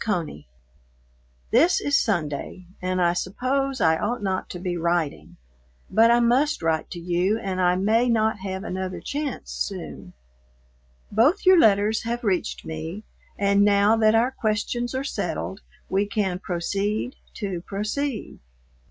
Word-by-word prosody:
CONEY, 165 - -3 1.0
This 325 +10 +4
is 285 - 0
Sunday 175 - -1 0.2
and 185 0 -1
I 175 -1 +3
suppose 260 +9 -1
I 160 -4 +3
ought 235 +1 -2
not 190 -1 -2
to - - -6
be 180 0 -3
writing, 170 -3 -2 0.5
but 225 +1 +5
I 235 0 +5
must 245 - +2
write 160 -1 0
to 175 - -7
you 180 +4 +1
and 190 -4 -3
I 180 0 +3
may 220 +6 +2
not 220 -2 +1
have 190 0 -5
another 185 -2 -4
chance 285 - -4
soon. - - -5 1.0
Both 270 - +3
your 370 -1 +7
letters 210 -2 +4
have 235 +1 -3
reached 190 -5 -1
me, 160 +6 -6 0.3
and 200 0 +3
now 205 +1 +4
that 220 0 +4
our 240 +3 +3
questions 240 +2 -2
are 260 - -1
settled 275 - -3 0.3
we 195 +2 0
can 195 -3 -1
proceed 200 +7 -2 0.2
to 195 -5 -4
proceed. 215 +7 -3
205 Hz, 145 wpm, -24 LUFS, 180-235 Hz, 1.0 s, your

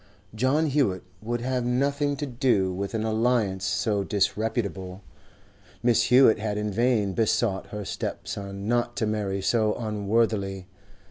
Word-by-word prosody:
John 130 +8 +2
Hewett 135 - +1 0.2
would 120 +2 -3
have 125 0 -1
nothing 140 +4 0
to 145 - -3
do 120 -8 +1
with 100 +4 -4
an 110 - -1
alliance 110 -4 +1
so 100 0 0
disreputable; 100 -2 -2 0.8
Mrs. 120 -2 +4
Hewett 125 -3 +6
had 105 -1 -2
in 105 0 -2
vain 110 -3 +1
besought 110 -2 0
her 105 -1 -6
stepson 100 +1 -5
not 120 0 0
to 110 - +1
marry 100 -3 -2
so 110 0 +2
unworthily. 105 -3 -1
110 Hz, 135 wpm, -26 LUFS, 100-120 Hz, 0.8 s, Hewett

